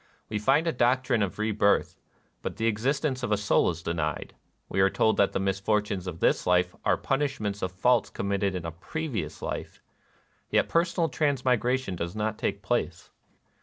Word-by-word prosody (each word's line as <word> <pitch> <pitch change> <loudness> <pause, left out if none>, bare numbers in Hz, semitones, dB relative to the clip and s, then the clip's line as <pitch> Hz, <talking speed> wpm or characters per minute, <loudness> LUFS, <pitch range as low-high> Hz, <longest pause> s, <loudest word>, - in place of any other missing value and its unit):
We 105 - -1
find 135 +9 +3
a 165 - +2
doctrine 125 -2 +2
of 100 -3 -1
rebirth; 105 -1 +2 0.5
but - - -4
the 115 - -2
existence 130 +5 0
of 120 - -2
a 105 - +3
soul 105 +1 +2
is 85 -1 -5
denied. 80 -3 -2 0.3
We 95 - 0
are 95 - +5
told 110 +2 +2
that 100 - +3
the - - -1
mis 95 0 0
fortunes 105 -2 0
of 85 -2 -6
this - - +2
life 90 0 +3
are - - +3
punishments 135 -8 -1
of 90 - -2
faults 120 +6 +2
committed 100 -1 -1
in 90 -2 -4
a 85 - -3
previous 100 - -5
life; - - -5 0.7
yet - - +2
personal 170 0 +1
transmigration 130 - 0
does 85 +2 -4
not 110 0 -2
take - - -2
place. - - -2
105 Hz, 175 wpm, -27 LUFS, 95-130 Hz, 0.7 s, are